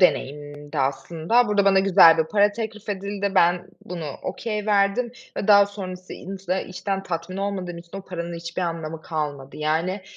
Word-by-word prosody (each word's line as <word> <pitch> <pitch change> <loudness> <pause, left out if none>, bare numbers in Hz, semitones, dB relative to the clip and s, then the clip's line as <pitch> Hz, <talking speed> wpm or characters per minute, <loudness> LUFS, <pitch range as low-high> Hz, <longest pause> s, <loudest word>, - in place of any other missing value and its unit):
deneyimimdi 145 -3 0
aslında. 160 - +1
Burada 205 -1 +3
bana 195 -1 +5
güzel 185 -4 +7
bir 160 - +3
para 205 +4 +3
teklif 220 -1 -6
edildi, 200 0 -2
ben 175 0 +3 0.2
bunu 170 -2 -6 0.2
okay 210 -2 -3
verdim 205 +4 +2 0.3
ve 205 - -3
daha 200 -1 +8
sonrasın 185 -3 -7
insa 190 0 -3
içten 195 +1 -3
tatmin 175 0 -4
olmadığım 190 -3 -3
için 170 +3 -10
o - - -8
paranın 170 -2 -5
hiçbir 170 +2 -4
anlamı 165 -2 -4
kalmadı. 145 -4 -4
Yani, 165 +6 -1
185 Hz, 160 wpm, -24 LUFS, 165-200 Hz, 0.3 s, daha